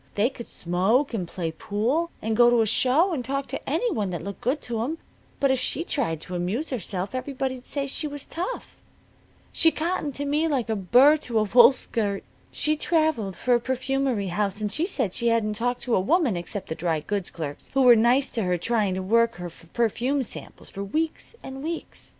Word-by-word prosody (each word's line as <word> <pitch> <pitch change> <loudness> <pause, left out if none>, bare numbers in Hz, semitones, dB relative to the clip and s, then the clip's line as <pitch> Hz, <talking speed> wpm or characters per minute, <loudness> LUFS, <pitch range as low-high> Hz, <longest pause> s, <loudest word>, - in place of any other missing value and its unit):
They 220 +6 +2
could 235 -3 -9
smoke, 195 +11 +1
and 185 -6 -2
play 170 -2 -3
pool, 235 - -1
and 220 0 0
go 240 +1 +6
to 240 -1 +4
a - - +3
show, 260 - +3
and 265 -6 -2
talk 275 +2 -2
to - - -5
any 485 -2 +1
one 210 - -1
that 175 -2 -4
looked 200 0 -7
good 260 +6 0
to 230 -2 -3
'em. 310 +7 -3 0.4
But 275 -1 +3
if 265 - +1
she 275 +5 -2
tried 230 - -2
to 180 - -7
amuse 190 - -2
herself 195 -4 -3
everybody'd 260 -1 -3
say 280 -1 -2
she 290 +3 -3
was 290 -1 -6
tough. 365 +9 -5 0.7
She 325 - +4
cottoned 315 -3 -2
to 285 - -3
me 300 +3 +1
like 260 -7 -1
a - - +1
burr 250 - +5
to 240 -6 -3
a 215 - +4
wool 235 +4 +7
skirt. 215 -6 -2 0.3
She 305 0 +1
traveled 310 - +1
for 250 - +1
a 240 - +4
perfumery 260 -4 -1
house, 200 +2 -1
and 210 -1 -2
she 325 +9 0
said 250 - -1
she 235 - 0
hadn't 225 -2 +2
talked 245 +3 -2
to 245 - -1
a - - +3
woman, 270 - +2
except 175 +3 -5
the - - -1
dry 160 -1 -1
goods 200 +3 -3
clerks 150 -4 -7
who 270 - +4
were 245 -2 +8
nice 240 +5 +3
to 230 - -2
her 180 -2 +1
trying 205 0 0
to 190 - -3
work 230 +4 +3
her 175 -1 -6
for 165 0 -18
her - - -32
perfume 245 +4 0
samples, - - -9
for 200 - -5
weeks 315 - -3
an' 265 0 -7
weeks. 325 +2 -5
240 Hz, 220 wpm, -25 LUFS, 200-280 Hz, 0.7 s, were